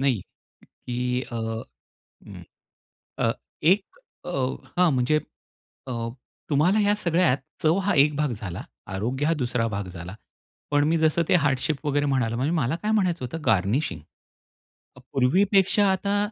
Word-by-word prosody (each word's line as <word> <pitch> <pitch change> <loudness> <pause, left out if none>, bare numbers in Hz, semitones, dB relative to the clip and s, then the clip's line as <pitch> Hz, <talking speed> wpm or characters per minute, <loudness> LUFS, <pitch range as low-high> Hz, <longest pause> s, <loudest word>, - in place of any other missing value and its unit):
नाही 135 -7 +2 0.5
की 120 - -8 0.3
अ 120 - -8
हं, 110 - -5 1.4
अ, - - +3 0.3
एक 190 +5 +5 0.4
अ, - - -5 0.5
हां, 180 -2 +5
म्हणजे 130 +4 +2 0.7
अ, - - -4 0.6
तुम्हाला 160 +9 +3
या 205 0 +3
सगळ्यात 170 -7 +2 0.3
चव 160 +3 +4
हा 205 - +2
एक 150 0 0
भाग 150 -2 0
झाला. 105 -6 -5 0.2
आरोग्य 120 +9 -2
हा 165 - +3
दुसरा 120 -2 0
भाग 100 -1 -3
झाला. 85 +1 -8 0.6
पण 145 0 +4
मी 165 +1 +3
जसं 160 +1 +2
ते - - +5
हार्ट 135 -3 +2
शेप 150 +1 -2
वगैरे 145 0 +1
म्हणालो 125 -5 +1
म्हणजे 135 +5 0
मला 135 -2 +1
काय 215 - +1
म्हणायचं 180 -10 +1
होतं 160 +7 -6
गार्निशिंग 100 - +1 1.0
मग - - -13
पूर्वीपेक्षा 195 +9 +3
आता 200 +2 0
145 Hz, 145 wpm, -25 LUFS, 120-170 Hz, 1.4 s, एक